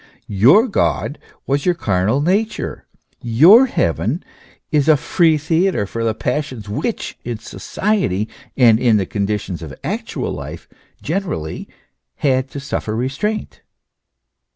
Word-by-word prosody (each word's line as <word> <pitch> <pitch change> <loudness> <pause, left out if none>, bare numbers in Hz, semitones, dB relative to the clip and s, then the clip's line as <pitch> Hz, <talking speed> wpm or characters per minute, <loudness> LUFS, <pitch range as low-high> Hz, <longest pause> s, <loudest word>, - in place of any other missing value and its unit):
Your 130 - +5
God 175 - -1 0.3
was 140 +1 0
your 180 -1 +2
carnal 105 - +1
nature, 205 +7 -1 0.3
your 165 - +6
heaven 100 - -1 0.5
only 145 -2 +3
a 150 - +5
free 165 +1 +2
theatre 160 - +1
for 115 +3 -4
the 110 -2 0
passions 125 -5 -3
which, 105 - -3
in 120 -1 -4
society 115 - -1 0.3
and 115 -4 +6
in 120 -4 +4
the 95 - 0
conditions 100 -2 -3
of 75 -5 -8
actual - - -3
life - - -7 0.4
generally, 160 - -3 0.5
had 130 -2 +1
to 140 - -6
suffer 135 -5 -3
restraint." 135 - -3
130 Hz, 125 wpm, -19 LUFS, 105-165 Hz, 0.5 s, your